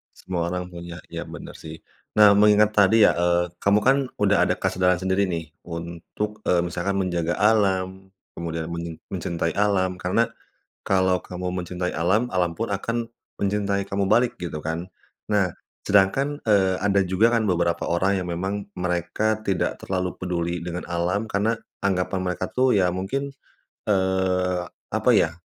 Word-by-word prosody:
Semua 90 -2 -3
orang 90 +1 -3
punya, 85 0 -9
iya - - -5
benar, - - -9
sih. 80 0 -9 0.4
Nah, 105 -1 +8
mengingat 105 0 +5
tadi, 105 +1 +5
ya, - - +7
eee, 85 0 +2
kamu, 100 +3 +3
kan, 135 +4 +5 0.2
udah 100 -1 +3
ada - - +1
kesadaran 90 0 +1
sendiri, 95 +1 +2
nih, 85 -4 -4 0.2
untuk, 85 +5 -5
eee, 85 -1 +3
misalkan 90 +3 -2
menjaga 85 -2 -1
alam, 95 -3 +1 0.2
kemudian 80 -1 -4
men 85 -1 -5 0.2
mencintai 85 -2 -2
alam 95 -3 +2
karena 95 +7 +1 0.6
kalau 95 -1 +3
kamu 90 0 -5
mencintai 90 +1 -3
alam, 95 +8 +2
alam 90 -2 +1
pun 115 - -2
akan 115 +4 -2 0.3
mencintai 100 0 0
kamu 100 0 0
balik, 120 +3 +3
gitu, 85 -3 -4
kan. 85 +3 -3 0.4
Nah, 100 -4 +2 0.3
sedangkan, 135 +10 +2
eee, 95 -4 +3
ada 100 -1 +2
juga, 95 +6 +3
kan, 110 - 0
beberapa 85 -3 +1
orang 95 +3 +1
yang - - -6
memang 95 +4 -3
mereka 90 +5 -1
tidak 95 -2 0
terlalu 90 -2 -3
peduli 85 -1 -2
dengan 85 +1 -5
alam 90 +6 -1
karena 105 +3 +1 0.3
anggapan 95 -1 0
mereka, 90 -1 -2
tuh, 130 0 +2
ya, 95 -3 +3
mungkin, 95 +11 -3 0.6
eee, 95 -2 +1 0.3
apa - - +2
ya, 80 - +3
95 Hz, 155 wpm, -24 LUFS, 85-100 Hz, 0.6 s, Nah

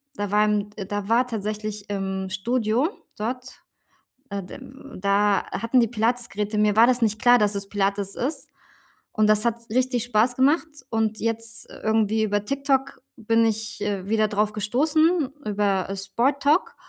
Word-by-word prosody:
da 205 -1 -3
waren 210 0 +2
äh, 200 - -5
da 205 0 -4
war 240 +3 +4
tatsächlich 210 -2 -5
im 190 -1 -3
Studio 230 - 0 0.3
dort 250 +4 -5 0.7
äh, 200 0 -3
d 180 - -10 0.4
da 200 +1 +2
hatten 230 +3 +1
die 235 - +3
Pilates-Geräte. 220 -2 -1
Mir 210 -1 +3
war 225 +2 +7
das 250 -1 +2
nicht 215 -1 0
klar, 245 0 +6
dass 210 -2 +2
es 200 0 -4
Pilates 200 0 -1
ist, 275 +6 -3 0.6
und 215 -1 +2
das 215 +1 +3
hat 235 0 -2
richtig 250 -1 +1
Spaß 240 +1 +2
gemacht 290 +6 +3 0.2
und 220 -1 -1
jetzt, 230 0 -2
äh, - - -12
irgendwie 220 0 +2
über 205 -1 0
TikTok 275 +1 -1 0.2
bin 230 0 +2
ich, 220 0 -2
äh, 200 -2 -2
wieder 215 0 +2
drauf 210 0 0
gestoßen 300 - +2 0.2
über 200 -2 0
Sporttalk 280 - +1
215 Hz, 155 wpm, -24 LUFS, 205-245 Hz, 0.7 s, war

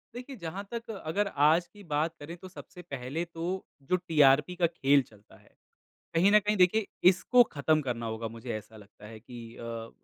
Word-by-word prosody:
देखिए 255 +3 -7
जहाँ 170 +4 -5
तक 230 -1 -5
अगर 200 +6 0 0.2
आज 165 +3 +4
की 205 -1 -16
बात 160 -1 -1
करें 150 +4 -8
तो 185 - -11
सबसे 180 0 -12
पहले 140 0 -4
तो 165 - -3 0.4
जो 180 - +3
टीआरपी 150 -2 +3
का 175 -1 +3
खेल 145 -4 +3
चलता 105 -1 -20
है। - - -24 0.6
कहीं 175 +5 +4
न 210 - +7
कहीं 210 +1 0
देखिए 190 +4 +4 0.2
इसको 245 +7 +4
ख़त्म 155 +2 +2
करना 120 -4 -3
होगा 110 0 -3
मुझे 115 +2 -9
ऐसा 110 +1 -13
लगता 105 0 -16
है 110 0 -10
कि 120 +2 -11 0.2
अ, 115 -1 -6
155 Hz, 190 wpm, -29 LUFS, 125-180 Hz, 0.6 s, न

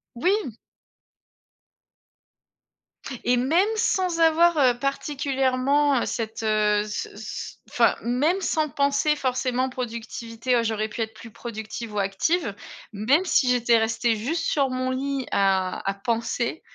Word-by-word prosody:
Oui! 370 - +1 2.7
Et 245 0 +3
même 325 - +3
sans 370 -6 0
avoir, 330 +1 +4
heu, 250 -4 +4
particulièrement, 275 0 +1
heu, - - -1
cette, 225 -1 -4
heu, 210 -1 +2
ce 210 - -5
c 215 +1 -7 0.2
enfin - - +3
même 295 +11 +1
sans 310 -3 0
penser 280 +2 +1
forcément 255 -1 -1
productivité: 235 0 -3
«Oh 230 - +1
j'aurais 220 -1 -1
pu 230 - -5
être 220 0 -3
plus 230 +1 -12
productive 220 -1 -7
ou 205 - -1
active», 200 - 0 0.4
même 265 - +2
si 260 -7 +3
j'étais 240 -1 +4
restée 225 +1 +1
juste 285 +11 -2
sur 275 -3 +1
mon 255 0 -2
lit 270 0 -2
à 190 -2 +1
à - - 0
penser, 235 +6 -2
250 Hz, 135 wpm, -24 LUFS, 225-285 Hz, 2.7 s, avoir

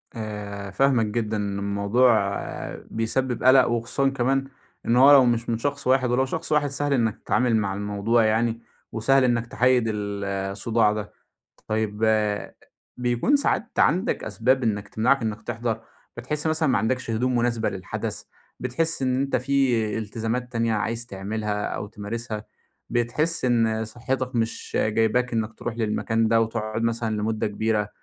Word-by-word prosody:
آآ، 100 -3 -6
فاهماك 130 0 +3
جدًا، 110 0 -2
إن 100 -1 -2
الموضوع 100 +1 +2 0.5
بيسبب 120 +3 -1
قلق، 130 0 +6
وخصوصًا 120 +4 0
كمان 135 +1 0 0.4
إن 115 - +2
هو 135 +3 +8
لو 135 -3 +8
مش 120 -1 0
من 115 - +1
شخص 140 +3 -3
واحد، 130 -1 +3
ولو 130 +2 +2
شخص 135 - -4
واحد 150 -1 +3
سهل 145 +1 -1
إنّك 115 -5 +1
تتعامل 125 -2 +2
مع 100 -3 0
الموضوع 105 +3 +1
يعني 115 +1 +1 0.3
وسهل 135 +4 +3
إنّك 120 -2 +1
تحيد 125 0 +3
ال 100 -2 -3
الصداع 100 +3 0
ده، 105 -1 -6 0.5
طيّب، 110 0 -1 0.9
بيكون 125 - +2
ساعات 250 -4 0
عندك 185 +10 +2
أسباب 130 +3 +1
إنّك 105 -2 -1
تمنعك 125 +4 +2
إنّك 110 -1 -3
تحضر، 115 -1 -3 0.4
بتحس 150 +6 -3
مثلًا 155 -1 +1
ما 130 - +3
عندكش 115 +3 -1
هدوم 125 +3 0
مناسبة 120 -2 +1
للحدث، 95 -2 -5 0.4
بتحس 150 +7 0
إن 130 -1 +1
أنت 135 +1 0
في 125 -5 +1
التزامات 115 +3 -3
تانية 115 -1 0
عايز 115 +2 -1
تعملها 105 0 -3
أو 100 - -4
تمارسها، 110 +1 -6 0.4
بتحس 130 +7 0
إن 115 -2 +2
صحتك 130 +3 -3
مش 115 -1 -2
جايباك 115 +3 +1
إنّك 110 -1 -1
تروح 115 +1 -5
للمكان 115 0 0
ده 115 0 +4
وتقعد 110 0 -2
مثلًا 115 -1 -1
لمدة 110 +1 -1
كبيرة 105 0 -1
115 Hz, 150 wpm, -24 LUFS, 110-125 Hz, 0.9 s, هو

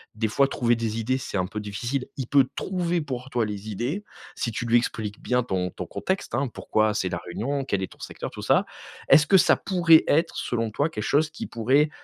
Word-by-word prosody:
des 110 +1 0
fois 140 +6 +3
trouver 120 -2 +2
des 115 -1 -2
idées 130 +4 0
c'est 120 -5 -4
un 90 - +1
peu 105 +3 -5
difficile- 120 +6 -3
il 130 -3 -3
peut 140 0 +5
trouver 175 -2 -1
pour 130 -3 -5
toi 120 -4 0
les 105 0 -6
idées 125 - -3 0.3
si 115 - -2
tu 120 - -3
lui 120 0 +2
expliques 110 -3 -3
bien 125 0 +1
ton 95 -5 -1
ton - - -6
contexte, 190 -9 -3
hein. 135 +2 0
Pourquoi 110 0 +1
c'est 95 - 0
la 85 -1 -3
réunion, 130 +11 -2
quel 100 -7 -1
est - - -5
ton - - -24
secteur - - -6
tout - - -8
ça. - - +3 0.4
Est-ce 150 0 +7
que 195 - +6
ça - - +5
pourrait 170 -4 +5
être 160 +3 +2
selon 115 -2 -2
toi 145 +8 0
quelque 105 -8 -5
chose 150 +2 +2
qui - - -6
pourrait, 130 +7 +2
120 Hz, 230 wpm, -25 LUFS, 110-145 Hz, 0.4 s, Est-ce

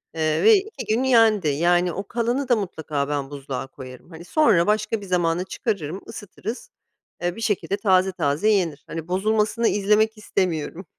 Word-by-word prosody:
eee, 155 -1 0
ve 445 +1 +8
2 410 +2 -3
gün 255 - 0
yendi. 225 -8 +4
Yani 175 +4 +2
o 195 +1 -5
kalanı 240 +4 -1
da 245 - +5
mutlaka 155 -8 -3
ben 140 -2 -2
buzluğa 135 -2 -5
koyarım. 130 +3 -12
Hani, 165 0 -11
sonra 210 - +3
başka 215 0 0
bir - - -8
zamana 175 -1 0
çıkarırım 190 - -4
ısıtırız, 210 +4 -7 0.5
eee, 175 0 -1
bir 225 - -8
şekilde 205 -2 -1
taze 190 -2 +3
taze 150 +4 0
yenir. 170 -9 0
Hani, 165 0 -6
bozulmasını 215 +4 +1
izlemek 210 +2 +2
istemiyorum. 180 -4 -2
190 Hz, 165 wpm, -23 LUFS, 160-215 Hz, 0.5 s, ve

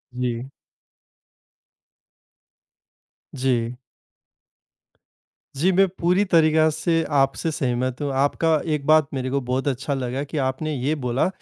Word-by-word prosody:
जी। 125 +1 -3 2.9
जी। 125 -2 -1 1.8
जी, 175 +8 +2
मैं 195 +1 +4
पूरी 180 +4 +3
तरीका 160 -3 +4
से 165 +1 0 0.2
आपसे 135 +4 0
सहमत 130 -2 -2
हूँ। 145 -1 -1
आपका 150 +3 +2
एक 140 -2 -3
बात 155 -1 +5
मेरे 130 -1 -2
को 140 +2 0
बहुत 130 +3 -2
अच्छा 140 +1 -1
लगा 130 +1 -3
कि 150 +2 -6
आपने 135 +3 -1
ये 140 +4 -1
बोला, 125 0 0
140 Hz, 115 wpm, -23 LUFS, 130-155 Hz, 2.9 s, बात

